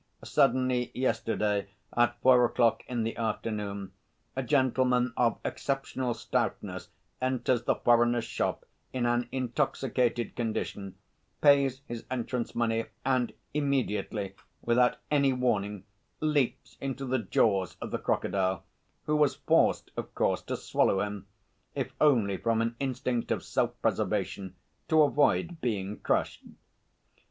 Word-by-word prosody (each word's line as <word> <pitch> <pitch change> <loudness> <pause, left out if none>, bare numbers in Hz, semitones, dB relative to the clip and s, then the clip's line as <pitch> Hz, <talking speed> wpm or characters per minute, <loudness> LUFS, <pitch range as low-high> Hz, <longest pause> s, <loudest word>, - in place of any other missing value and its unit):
Suddenly 130 -1 +2
yesterday 105 -5 0 0.3
at 120 0 +2
four 125 -1 +6
o'clock 120 -1 +2
in 120 -2 -1
the 115 - -2
afternoon 105 -3 -3 0.4
a 130 - 0
gentleman 130 -2 +2
of 120 -2 +2
exceptional 130 -3 -2
stoutness - - -2 0.3
enters 130 -2 0
the - - +3
foreigner's 120 0 +3
shop - - -2 0.3
in 125 -2 -1
an 120 0 +1
intoxicated 125 -2 0
condition, 105 -4 -3 0.4
pays 140 -2 +4
his 120 -3 -6
entrance 125 -1 -3
money, 115 -1 +1 0.2
and 130 -3 +1 0.2
immediately 125 -8 -1 0.3
without 125 +1 +3
any 140 -2 +4
warning 105 -6 0 0.4
leaps 150 -5 0
into 135 0 -3
the 130 0 0
jaws 95 -4 +1
of - - -6
the - - -1
crocodile, 95 -2 0 0.4
who 150 - 0
was 150 -2 +3
forced, - - +2
of - - -6
course, - - +1
to - - -4
swallow 95 - +1
him, 105 -1 -4 0.5
if - - -3
only 115 -10 +4
from 115 +1 +1
an 115 +1 0
instinct 125 -3 -2
of - - -1
self - - -1
preservation, 95 -2 -1 0.3
to 155 -1 +5
avoid 150 +5 +2
being 105 -4 -2
crushed. - - 0
120 Hz, 125 wpm, -29 LUFS, 110-130 Hz, 0.5 s, four